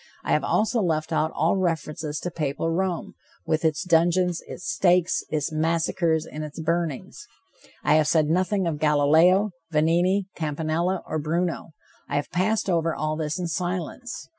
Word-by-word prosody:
I -, -, -2 dB
have -, -, +2 dB
also 225 Hz, +2 st, +1 dB
left 160 Hz, -3 st, -1 dB
out 155 Hz, 0 st, +1 dB
all 165 Hz, +5 st, +2 dB
reference 155 Hz, -4 st, -2 dB
to 175 Hz, -, -4 dB
Papal 155 Hz, +1 st, -2 dB
Rome, 180 Hz, 0 st, -2 dB, 0.3 s
with 155 Hz, 0 st, 0 dB
its 160 Hz, 0 st, +1 dB
dungeons, 175 Hz, 0 st, +2 dB
its -, -, -8 dB
stakes, 180 Hz, -1 st, +2 dB
its 155 Hz, 0 st, -1 dB
massacres 160 Hz, 0 st, 0 dB
and 155 Hz, -1 st, -7 dB
its 150 Hz, +1 st, -8 dB
burnings. 165 Hz, -3 st, -3 dB, 0.6 s
I 150 Hz, +1 st, +4 dB
have 155 Hz, -1 st, +2 dB
said 155 Hz, -2 st, +3 dB
nothing 185 Hz, +4 st, +1 dB
of 160 Hz, -3 st, -2 dB
Galileo, 160 Hz, +7 st, +4 dB, 0.2 s
Vanini, 175 Hz, +5 st, +2 dB
Campanella 160 Hz, +4 st, -1 dB
or 155 Hz, -, -3 dB
Bruno. 165 Hz, +2 st, -2 dB, 0.4 s
I -, -, -2 dB
have 145 Hz, 0 st, -2 dB
passed 200 Hz, +5 st, 0 dB
over 165 Hz, -3 st, +1 dB
all 155 Hz, 0 st, -2 dB
this 155 Hz, -1 st, -2 dB
in 180 Hz, -, -3 dB
silence. 180 Hz, -, -4 dB
165 Hz, 160 wpm, -25 LUFS, 155-180 Hz, 0.6 s, I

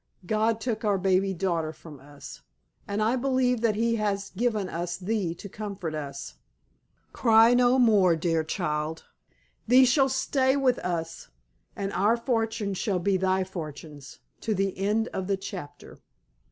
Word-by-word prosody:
God 220 Hz, +3 st, +1 dB
took 225 Hz, -1 st, -3 dB
our 205 Hz, -2 st, +2 dB
baby 190 Hz, +1 st, +2 dB
daughter 170 Hz, -4 st, -1 dB
from 155 Hz, -2 st, -13 dB
us, 140 Hz, 0 st, -12 dB, 0.5 s
and 205 Hz, +1 st, -1 dB
I 225 Hz, +4 st, +2 dB
believe 255 Hz, -2 st, +1 dB
that 225 Hz, -3 st, +2 dB
He 230 Hz, +1 st, +1 dB
has 200 Hz, -2 st, -2 dB
given 215 Hz, -1 st, -1 dB
us 175 Hz, 0 st, -4 dB
thee 190 Hz, -3 st, -2 dB
to 200 Hz, -, -9 dB
comfort 200 Hz, -5 st, -6 dB
us. 140 Hz, -2 st, -6 dB, 0.8 s
Cry 225 Hz, 0 st, +5 dB
no 245 Hz, +1 st, +4 dB
more, 205 Hz, -8 st, +4 dB
dear 165 Hz, 0 st, 0 dB
child, 155 Hz, -2 st, -3 dB, 0.6 s
thee 255 Hz, +3 st, +7 dB
shall 270 Hz, +2 st, +3 dB
stay 265 Hz, 0 st, +1 dB
with 260 Hz, -3 st, +2 dB
us, 165 Hz, -2 st, -4 dB, 0.5 s
and 195 Hz, 0 st, -4 dB
our 215 Hz, +4 st, +2 dB
fortunes 225 Hz, -5 st, -2 dB
shall 200 Hz, -4 st, 0 dB
be 190 Hz, +2 st, +1 dB
thy 190 Hz, 0 st, +1 dB
fortunes, 150 Hz, -5 st, -9 dB, 0.2 s
to 220 Hz, -, -2 dB
the 195 Hz, 0 st, -1 dB
end 210 Hz, +4 st, 0 dB
of 190 Hz, -1 st, -4 dB
the 200 Hz, -1 st, 0 dB
chapter." 185 Hz, -6 st, -9 dB
200 Hz, 155 wpm, -27 LUFS, 175-225 Hz, 0.8 s, thee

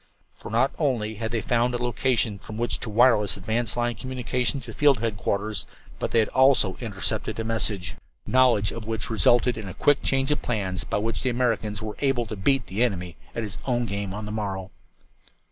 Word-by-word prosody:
For -, -, -10 dB
not 120 Hz, +5 st, +2 dB
only 120 Hz, -8 st, 0 dB
had 110 Hz, -, -1 dB
they 115 Hz, 0 st, -1 dB
found 120 Hz, +2 st, +1 dB
a -, -, +1 dB
location 120 Hz, -3 st, 0 dB
from 110 Hz, +1 st, -9 dB
which 120 Hz, +1 st, -1 dB
to 115 Hz, -, -5 dB
wireless 110 Hz, -3 st, +4 dB
advance 110 Hz, +5 st, -1 dB
line 120 Hz, 0 st, +1 dB
communications 125 Hz, +2 st, -2 dB
to 115 Hz, -, -8 dB
field 145 Hz, 0 st, +4 dB
headquarters, 105 Hz, -1 st, -2 dB, 0.3 s
but -, -, -1 dB
they -, -, +1 dB
had 110 Hz, -2 st, +3 dB
also 130 Hz, -8 st, +4 dB
intercepted 110 Hz, 0 st, -2 dB
a -, -, -1 dB
message, 110 Hz, -5 st, -1 dB, 0.3 s
knowledge 125 Hz, -5 st, +4 dB
of 115 Hz, -2 st, -7 dB
which 110 Hz, 0 st, -3 dB
resulted 120 Hz, +4 st, +3 dB
in 105 Hz, -, -6 dB
a 95 Hz, -, -7 dB
quick 145 Hz, -1 st, +3 dB
change 135 Hz, +1 st, +1 dB
of 145 Hz, -, 0 dB
plans 95 Hz, -6 st, -2 dB
by -, -, -2 dB
which 110 Hz, +2 st, -1 dB
the 130 Hz, -, +1 dB
Americans 115 Hz, -4 st, 0 dB
were 105 Hz, -1 st, -5 dB
able 135 Hz, -4 st, +1 dB
to 110 Hz, -, -6 dB
beat 125 Hz, +6 st, +1 dB
the 105 Hz, +6 st, 0 dB
enemy 90 Hz, -7 st, -2 dB, 0.2 s
at 115 Hz, -, -2 dB
his 105 Hz, -2 st, -6 dB
own 120 Hz, -2 st, +1 dB
game 100 Hz, -2 st, -3 dB
on 105 Hz, +2 st, -5 dB
the 105 Hz, -, -5 dB
morrow. 100 Hz, -3 st, -3 dB
115 Hz, 200 wpm, -25 LUFS, 105-125 Hz, 0.3 s, wireless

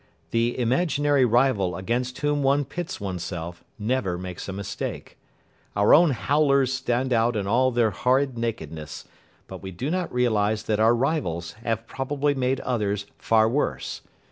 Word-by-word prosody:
The 115 Hz, +1 st, +1 dB
imaginary 140 Hz, +2 st, +2 dB
rival 115 Hz, -7 st, +2 dB
against 120 Hz, +7 st, -2 dB
whom 145 Hz, 0 st, +1 dB
one 140 Hz, +1 st, +2 dB
pits 175 Hz, +6 st, -5 dB
oneself 90 Hz, -3 st, -5 dB
never 105 Hz, -5 st, -1 dB
makes 90 Hz, +1 st, -7 dB
a -, -, -2 dB
mistake. 100 Hz, +1 st, -5 dB, 0.6 s
Our 100 Hz, 0 st, +5 dB
own 170 Hz, +1 st, +7 dB
"howlers" 140 Hz, +2 st, +2 dB
stand 130 Hz, 0 st, 0 dB
out 115 Hz, +1 st, +2 dB
in 100 Hz, -2 st, -1 dB
all 125 Hz, +6 st, +3 dB
their 120 Hz, -3 st, +2 dB
horrid 130 Hz, +5 st, +1 dB
nakedness; 80 Hz, -10 st, -5 dB, 0.4 s
but -, -, -9 dB
we 95 Hz, -, -6 dB
do 110 Hz, -, -4 dB
not 180 Hz, 0 st, -1 dB
realise 110 Hz, -3 st, +1 dB
that 110 Hz, -1 st, 0 dB
our 115 Hz, +2 st, +5 dB
rivals 115 Hz, -, -1 dB
have 115 Hz, -1 st, -2 dB
probably 145 Hz, +4 st, -1 dB
made 130 Hz, -1 st, 0 dB
others 105 Hz, -5 st, -1 dB
far 110 Hz, -1 st, +3 dB
worse. 135 Hz, +6 st, -2 dB
120 Hz, 150 wpm, -25 LUFS, 100-135 Hz, 0.6 s, own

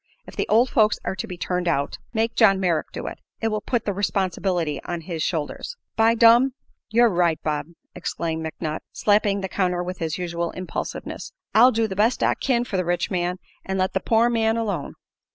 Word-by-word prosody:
If -, -, -12 dB
the -, -, -1 dB
old 235 Hz, +4 st, +4 dB
folks 215 Hz, -1 st, +4 dB
are -, -, -1 dB
to 230 Hz, -, -4 dB
be 180 Hz, -3 st, -7 dB
turned 180 Hz, +1 st, -2 dB
out, 145 Hz, -4 st, 0 dB
make 225 Hz, 0 st, 0 dB
John 195 Hz, -4 st, +5 dB
Merrick 170 Hz, -5 st, 0 dB
do -, -, -6 dB
it; -, -, -6 dB, 0.2 s
it 225 Hz, -, 0 dB
will 215 Hz, -1 st, -2 dB
put 240 Hz, 0 st, -1 dB
the 205 Hz, -, 0 dB
responsibility 185 Hz, -4 st, -1 dB
on 175 Hz, -1 st, -4 dB
his 165 Hz, -1 st, -5 dB
shoulders." 160 Hz, -, -3 dB, 0.2 s
"By 225 Hz, +1 st, +4 dB
dum, 235 Hz, +3 st, +6 dB, 0.4 s
yer 235 Hz, +2 st, +5 dB
right, 175 Hz, -5 st, +2 dB
Bob!" 150 Hz, -1 st, -1 dB, 0.3 s
exclaimed 165 Hz, -2 st, -3 dB
McNutt. 160 Hz, -1 st, -4 dB
slapping 205 Hz, -1 st, +2 dB
the 190 Hz, -, -2 dB
counter 180 Hz, -2 st, 0 dB
with 180 Hz, +1 st, -5 dB
his 160 Hz, -2 st, -2 dB
usual 170 Hz, -1 st, -2 dB
impulsiveness. 185 Hz, 0 st, -5 dB, 0.2 s
"I'll 245 Hz, +4 st, +7 dB
do 225 Hz, -1 st, +1 dB
the 190 Hz, -, -5 dB
best 220 Hz, +5 st, +2 dB
I -, -, +4 dB
kin 240 Hz, -3 st, 0 dB
for 210 Hz, -5 st, -3 dB
the 185 Hz, -, +1 dB
rich 175 Hz, +3 st, -1 dB
man, 180 Hz, 0 st, -1 dB, 0.3 s
an' 190 Hz, 0 st, -3 dB
let 185 Hz, 0 st, 0 dB
the 190 Hz, -, +1 dB
poor 225 Hz, +4 st, +3 dB
man 225 Hz, -1 st, +1 dB
alone." 200 Hz, -10 st, -3 dB
190 Hz, 205 wpm, -23 LUFS, 175-225 Hz, 0.4 s, I'll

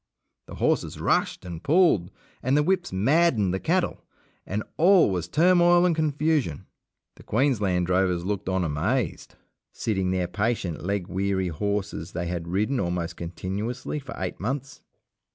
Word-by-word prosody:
The -, -, -9 dB
horses -, -, 0 dB
rushed -, -, 0 dB
and 85 Hz, -2 st, -7 dB
pulled, 155 Hz, -, +3 dB, 0.3 s
and 130 Hz, +3 st, +2 dB
the 150 Hz, -, +3 dB
whips 185 Hz, +2 st, 0 dB
maddened 110 Hz, -, +2 dB
the 95 Hz, -, -1 dB
cattle, 175 Hz, -, 0 dB, 0.4 s
and 105 Hz, +3 st, -2 dB
all 180 Hz, -, +5 dB
was 90 Hz, -2 st, -2 dB
turmoil 175 Hz, -, +4 dB
and 175 Hz, -2 st, +2 dB
confusion. 150 Hz, -, 0 dB, 0.5 s
The -, -, -14 dB
Queensland 105 Hz, -8 st, +1 dB
drovers 90 Hz, -1 st, +1 dB
looked 100 Hz, -2 st, -2 dB
on 95 Hz, -1 st, 0 dB
amazed, 85 Hz, -, -2 dB, 0.4 s
sitting 95 Hz, -4 st, -1 dB
their 90 Hz, -1 st, 0 dB
patient 95 Hz, -3 st, -2 dB
leg 100 Hz, 0 st, -1 dB
weary 95 Hz, 0 st, -1 dB
horses 100 Hz, 0 st, -3 dB
they 85 Hz, 0 st, -3 dB
had 85 Hz, -1 st, -4 dB
ridden 105 Hz, +9 st, 0 dB
almost 85 Hz, -3 st, -2 dB
continuously 100 Hz, -, -4 dB
for 140 Hz, -1 st, -9 dB
eight 95 Hz, -1 st, -4 dB
months. 135 Hz, +7 st, -4 dB
100 Hz, 145 wpm, -25 LUFS, 90-145 Hz, 0.5 s, all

